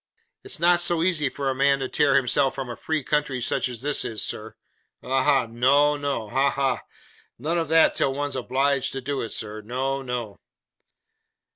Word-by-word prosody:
It's 400 Hz, -, -3 dB
not 175 Hz, 0 st, +4 dB
so 175 Hz, -1 st, +2 dB
easy 165 Hz, -6 st, +1 dB
for 140 Hz, +1 st, -4 dB
a -, -, -1 dB
man 140 Hz, +1 st, +3 dB
to 135 Hz, -1 st, -3 dB
tear 145 Hz, -1 st, +2 dB
himself 135 Hz, +1 st, +2 dB
from 130 Hz, -2 st, -5 dB
a -, -, -6 dB
free 155 Hz, +2 st, -2 dB
country 145 Hz, -2 st, 0 dB
such 125 Hz, -, 0 dB
as 120 Hz, 0 st, -8 dB
this 145 Hz, 0 st, 0 dB
is, 110 Hz, -2 st, -2 dB
sir. 110 Hz, +1 st, -6 dB, 0.5 s
Ha, 130 Hz, +1 st, 0 dB
ha! 135 Hz, -3 st, +3 dB
No, 135 Hz, +6 st, +3 dB
no! 140 Hz, -6 st, -3 dB
Ha, 135 Hz, +5 st, +2 dB
ha! 135 Hz, -2 st, -1 dB, 0.6 s
None 160 Hz, +7 st, -1 dB
of 165 Hz, -, -2 dB
that 160 Hz, 0 st, +5 dB
till 135 Hz, -, +1 dB
one's 145 Hz, -1 st, -3 dB
obliged 135 Hz, +2 st, 0 dB
to 135 Hz, -, -4 dB
do 140 Hz, +1 st, -3 dB
it, 115 Hz, -, -4 dB
sir. 110 Hz, 0 st, -5 dB
No, 130 Hz, +5 st, -2 dB
no! 125 Hz, -5 st, -5 dB
135 Hz, 190 wpm, -24 LUFS, 125-145 Hz, 0.6 s, that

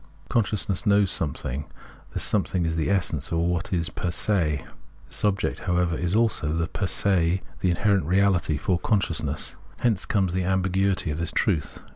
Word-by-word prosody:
Consciousness 105 Hz, -2 st, 0 dB
knows 100 Hz, -2 st, +4 dB
something; 70 Hz, -2 st, -3 dB, 0.5 s
this -, -, +3 dB
something 90 Hz, -3 st, +1 dB
is 80 Hz, 0 st, -1 dB
the 80 Hz, +1 st, 0 dB
essence 85 Hz, -7 st, 0 dB
or 85 Hz, +1 st, +1 dB
what 90 Hz, +2 st, -1 dB
is 85 Hz, -3 st, 0 dB
fer 90 Hz, -, -3 dB
se. 85 Hz, -5 st, +1 dB, 0.4 s
This -, -, -5 dB
object, 100 Hz, -1 st, +1 dB
however, 90 Hz, -2 st, 0 dB
is 90 Hz, +3 st, -1 dB
also 110 Hz, -9 st, +1 dB
the 80 Hz, 0 st, 0 dB
fer 95 Hz, +3 st, -3 dB
se, 95 Hz, -2 st, +1 dB, 0.2 s
the 95 Hz, -, +1 dB
inherent 100 Hz, 0 st, +2 dB
reality, 90 Hz, -3 st, +2 dB
for 90 Hz, +4 st, 0 dB
consciousness. 105 Hz, -3 st, -1 dB, 0.2 s
Hence 110 Hz, -6 st, 0 dB
comes 95 Hz, -4 st, +1 dB
the 95 Hz, 0 st, 0 dB
ambiguity 95 Hz, -1 st, +1 dB
of 75 Hz, -, -4 dB
this 85 Hz, -, -1 dB
truth. 75 Hz, -, 0 dB
90 Hz, 165 wpm, -25 LUFS, 85-100 Hz, 0.5 s, knows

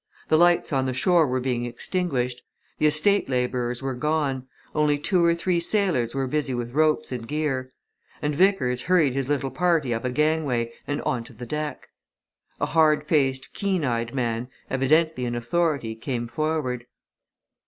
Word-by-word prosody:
The 155 Hz, -, +5 dB
lights 175 Hz, -2 st, +3 dB
on 135 Hz, -1 st, +1 dB
the 130 Hz, -, -2 dB
shore 170 Hz, +3 st, +4 dB
were 130 Hz, 0 st, 0 dB
being 125 Hz, -2 st, -1 dB
extinguished; 125 Hz, -1 st, -2 dB, 0.4 s
the 155 Hz, -, +4 dB
estate 155 Hz, +6 st, +3 dB
labourers 125 Hz, -1 st, -1 dB
were 135 Hz, -1 st, -1 dB
gone; 135 Hz, -1 st, -1 dB, 0.3 s
only 150 Hz, -1 st, +2 dB
two 175 Hz, +4 st, +1 dB
or 170 Hz, 0 st, +4 dB
three 170 Hz, +1 st, 0 dB
sailors 170 Hz, -, +1 dB
were 135 Hz, -1 st, 0 dB
busy 140 Hz, -1 st, -1 dB
with 120 Hz, 0 st, -4 dB
ropes 155 Hz, -1 st, +2 dB
and 120 Hz, -3 st, -5 dB
gear. 135 Hz, -3 st, -2 dB, 0.5 s
And 150 Hz, 0 st, -1 dB
Vickers 140 Hz, -8 st, +2 dB
hurried 165 Hz, -7 st, +3 dB
his 135 Hz, 0 st, -2 dB
little 140 Hz, -2 st, 0 dB
party 155 Hz, -3 st, +1 dB
up 115 Hz, -, -3 dB
a 125 Hz, -, 0 dB
gangway 140 Hz, -5 st, 0 dB
and 145 Hz, -, -2 dB
on 120 Hz, -2 st, -1 dB
to -, -, -12 dB
the 125 Hz, -, -8 dB
deck. 150 Hz, +4 st, -4 dB, 0.7 s
A -, -, +1 dB
hard 155 Hz, -2 st, +3 dB
faced, 135 Hz, -4 st, +1 dB
keen 190 Hz, -6 st, 0 dB
eyed, 115 Hz, 0 st, -2 dB
man, 120 Hz, -2 st, -1 dB, 0.2 s
evidently 145 Hz, +1 st, +2 dB
in 120 Hz, 0 st, -2 dB
authority, 130 Hz, -1 st, 0 dB
came 120 Hz, +1 st, -4 dB
forward. 130 Hz, -2 st, -2 dB
135 Hz, 165 wpm, -25 LUFS, 125-155 Hz, 0.7 s, The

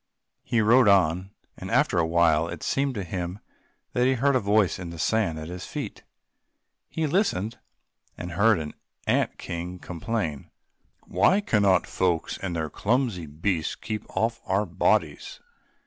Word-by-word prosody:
He 120 Hz, -2 st, +1 dB
rode 120 Hz, +3 st, +5 dB
on, 95 Hz, -1 st, +3 dB, 0.3 s
and -, -, -8 dB
after -, -, +2 dB
a 80 Hz, -, +2 dB
while 80 Hz, -1 st, +3 dB
it 85 Hz, -2 st, -7 dB
seemed 135 Hz, -1 st, 0 dB
to 100 Hz, -, -3 dB
him 90 Hz, +1 st, -4 dB, 0.6 s
that 125 Hz, +1 st, +2 dB
he 130 Hz, -, +3 dB
heard 140 Hz, +2 st, +2 dB
a -, -, +4 dB
voice 100 Hz, -4 st, +2 dB
in 90 Hz, -2 st, -6 dB
the 85 Hz, -, -8 dB
sand 95 Hz, -2 st, +1 dB
at 80 Hz, 0 st, -6 dB
his 90 Hz, +1 st, -7 dB
feet. -, -, -6 dB, 0.9 s
He 160 Hz, -, -1 dB
listened, 130 Hz, -, 0 dB, 0.6 s
and 90 Hz, 0 st, -6 dB
heard 105 Hz, +4 st, +4 dB
an 75 Hz, -2 st, -5 dB, 0.3 s
ant -, -, +1 dB
king 85 Hz, +1 st, -5 dB
complain, 85 Hz, -4 st, -4 dB, 0.6 s
"Why 105 Hz, -, +3 dB
cannot 100 Hz, -, +3 dB
folks, 90 Hz, -3 st, -1 dB
with 90 Hz, -3 st, -3 dB
their 80 Hz, -1 st, -1 dB
clumsy 115 Hz, -, 0 dB
beasts, 80 Hz, +2 st, -1 dB
keep 110 Hz, -1 st, -5 dB
off 115 Hz, +1 st, -1 dB
our 100 Hz, +2 st, +1 dB
bodies? 90 Hz, -3 st, 0 dB
95 Hz, 155 wpm, -26 LUFS, 85-115 Hz, 0.9 s, rode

